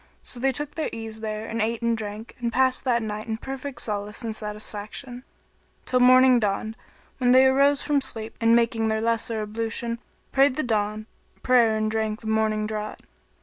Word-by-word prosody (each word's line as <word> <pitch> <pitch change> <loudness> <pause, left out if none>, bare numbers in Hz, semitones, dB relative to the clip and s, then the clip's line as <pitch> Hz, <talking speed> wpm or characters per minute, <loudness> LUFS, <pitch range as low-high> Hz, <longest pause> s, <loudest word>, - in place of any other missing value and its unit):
So 245 - -4
they 270 +2 +2
took 295 +3 -1
their 315 - -2
ease 225 -1 -6
there 215 0 -4
and 225 0 -2
ate 230 +2 -1
and 235 0 +2
drank 215 +1 -7
and 235 -1 -2
passed 260 +2 +1
that 235 -3 +2
night 215 0 -5
in 220 -1 -2
perfect 270 0 -6
solace 210 +1 -3
and 225 -1 -3
satisfaction, 215 +4 -6 0.6
till 250 - +1
morning 255 0 +6
dawned, 215 +1 -1 0.4
when 250 -1 +4
they 260 +1 +7
arose 275 +2 +4
from 295 -1 +1
sleep 225 -4 -1
and 230 0 +5
making 230 -1 +2
their 220 0 0
lesser 225 -1 0
ablution, 230 +2 -3 0.3
prayed 275 -1 +4
the 310 - -1
dawn 215 -2 -1 0.4
prayer 235 -4 +4
and 215 0 0
drank 220 -1 -2
the - - -14
morning 220 -1 +1
draught. 215 0 -5
225 Hz, 185 wpm, -25 LUFS, 215-250 Hz, 0.6 s, they